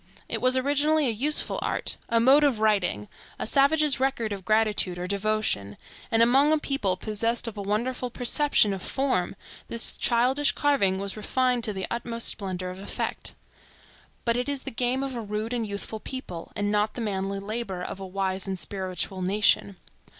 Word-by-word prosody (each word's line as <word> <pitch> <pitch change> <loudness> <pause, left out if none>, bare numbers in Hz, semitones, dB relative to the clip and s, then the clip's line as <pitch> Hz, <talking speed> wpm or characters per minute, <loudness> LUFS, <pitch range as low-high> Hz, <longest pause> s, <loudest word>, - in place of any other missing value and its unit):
It - - -3
was 255 +1 +3
originally 290 +3 +2
a 245 - +2
useful 280 +8 +3
art, - - -1
a 230 - +3
mode 270 +5 +6
of 270 -7 +2
writing, 195 - +1 0.3
a - - -3
savage's 280 +3 +3
record 260 -5 0
of 195 -1 -7
gratitude 215 -3 +1
or 175 - -4
devotion, 200 - -1 0.3
and 230 -1 +4
among 270 +5 +4
a 310 - +5
people 275 -11 -1
possessed 225 +5 -1
of 225 - -5
a 205 - -5
wonderful 240 +5 -2
perception 245 -3 +2
of 190 - -5
form 255 -10 -1 0.3
this 230 0 0
childish 255 +4 +2
carving 270 -11 +2
was 200 0 -4
refined 250 +3 0
to 215 - +1
the 190 -1 -3
utmost 235 0 0
splendor 185 -3 -4
of 185 - -9
effect. 200 - -4 0.9
But 235 -1 +2
it 250 +3 -1
is 280 -2 -3
the - - -5
game 250 +3 0
of 270 -2 -4
a 235 - -3
rude 215 +2 -3
and 230 -3 -1
youthful 205 +2 -5
people, 210 -10 -7
and 205 -1 -1
not 210 +1 +1
the 245 - -4
manly 195 -2 -2
labor 200 -2 -4
of 190 - -6
a 190 - -6
wise 190 0 -2
and 190 -1 -3
spiritual 185 0 -3
nation. 200 +1 +2
220 Hz, 180 wpm, -26 LUFS, 195-255 Hz, 0.9 s, mode